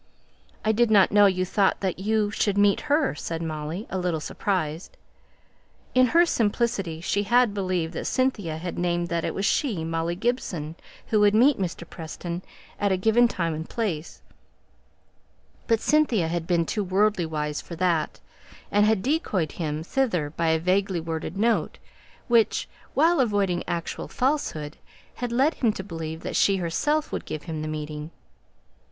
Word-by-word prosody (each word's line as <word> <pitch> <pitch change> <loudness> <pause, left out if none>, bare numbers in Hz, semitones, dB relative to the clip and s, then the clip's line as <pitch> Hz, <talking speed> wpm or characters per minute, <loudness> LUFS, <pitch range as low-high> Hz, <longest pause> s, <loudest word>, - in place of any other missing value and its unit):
"I 215 - +4
did 235 +1 +3
not 200 -3 +5
know 205 0 +6
you 185 -1 +1
thought 195 +1 +1
that 190 -2 -2
you 210 +1 +1
should 205 -1 0
meet 205 -1 +4
her," 290 0 +3
said 165 +2 -4
Molly, 160 +5 -4
a 190 - -1
little 175 -3 -1
surprised. 165 -1 -3 1.0
In 255 0 +5
her 340 +7 +5
simplicity 205 - 0
she 200 +4 0
had 235 +1 +3
believed 185 -4 -1
that - - -4
Cynthia 210 -12 0
had 175 +2 -5
named 175 0 0
that 170 -1 -1
it - - -2
was 195 - -1
she, 210 - 0
Molly 165 +1 -2
Gibson, 180 - -2 0.4
who 215 - +3
would 205 0 +4
meet 255 +3 +5
Mr. 170 -2 -4
Preston 170 +2 -6 0.4
at 200 -1 +1
a 190 - +2
given 225 +5 +4
time 170 -7 -2
and 160 +1 -6
place; 180 -9 -3 1.4
but 230 -2 +3
Cynthia 240 - +2
had 170 -1 -3
been 170 -2 +2
too 210 +5 -1
worldly 195 -1 +1
wise 150 -1 -3
for 170 - -9
that, 170 -2 0 0.5
and 205 +1 +4
had 215 -3 +2
decoyed 215 - 0
him 155 -2 -3
thither 180 - 0
by 165 +1 -1
a 160 0 +3
vaguely 185 +2 +1
worded 165 +2 -4
note, 225 +2 +1 0.5
which, 235 -3 +3 0.3
while 330 +2 +4
avoiding 200 -7 +1
actual 170 -1 -3
falsehood, 245 - -1 0.4
had 245 -1 -3
led 270 +7 +3
him 235 -4 +1
to 190 - -6
believe 165 -3 -6
that - - -5
she 195 -1 +4
herself 295 - 0
would - - -3
give 155 - -5
him 160 -3 -5
the 155 - -4
meeting. 150 0 -5
185 Hz, 165 wpm, -25 LUFS, 165-220 Hz, 1.4 s, know